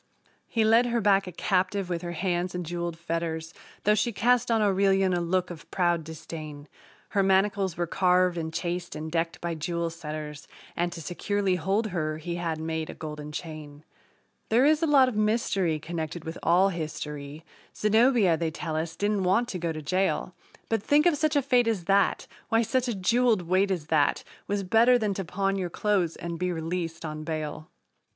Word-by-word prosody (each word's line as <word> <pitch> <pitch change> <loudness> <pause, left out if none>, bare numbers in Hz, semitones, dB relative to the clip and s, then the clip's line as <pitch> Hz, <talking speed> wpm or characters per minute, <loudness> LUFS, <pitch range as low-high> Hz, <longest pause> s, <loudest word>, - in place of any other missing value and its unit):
He 225 - +1
led 230 +3 +5
her 235 0 +1
back 195 -2 +3
a - - -5
captive 185 +2 0
with 175 -2 -3
her 175 -1 -5
hands 175 +1 -1
in 180 - -2
jeweled 170 0 -4
fetters, 165 -1 -3 0.3
Though 210 - +4
she 215 +3 +1
cast 240 +4 +2
on 225 -1 +3
Aurelian 195 -2 +3
a 175 - +1
look 180 +1 0
of 165 -3 -11
proud 175 -3 +1
disdain; 155 -2 -8 0.4
Her 200 - +1
manacles 195 -1 +2
were 175 - 0
carved 180 0 +2
and 160 -1 -3
chased 175 +1 -3
and 155 +1 -5
decked 165 0 -1
by 170 -1 -2
jewel 170 +1 -2
setters, 150 -2 -7 0.3
And 175 0 0
to 165 - -7
securely 195 +4 -1
hold 195 +5 0
her 155 -3 -1
he 170 +2 -4
had 165 -2 -2
made 160 0 -3
a - - -7
golden 150 -1 -7
chain. 150 -2 -8 0.7
There 240 +4 +4
is 310 +1 +4
a 330 - +2
lot 275 -3 +6
of 250 - -3
mystery 210 -6 +1
connected 160 +1 -5
with 160 +1 -6
all 185 +3 +4
history 150 -3 -6 0.3
Zenobia, 220 -4 +4
they 165 0 -1
tell 160 0 -5
us, 160 +1 -2
didn't 205 0 0
want 195 +7 +2
to 185 - -4
go 170 -1 -1
to 155 -1 -6
jail, 185 +3 0 0.3
But, 225 -2 0
think 290 - +3
of 345 -3 +4
such 310 +1 0
a 285 - +3
fate 245 -3 +3
as 205 -7 -1
that! 195 +1 +2 0.2
Why, 225 +1 +3
such 255 +3 0
a 235 - -1
jeweled 220 +1 +2
weight 185 +3 +2
as 175 -6 -2
that 145 -2 +2 0.2
Was 200 0 -1
better 230 +6 +5
than 215 -4 0
to 195 - -3
pawn 195 +3 -1
your 185 -2 -2
clothes 185 -3 0
and 170 -1 -6
be 180 0 0
released 165 0 -3
on 155 0 -5
bail! 155 -1 -4
180 Hz, 195 wpm, -27 LUFS, 165-205 Hz, 0.7 s, lot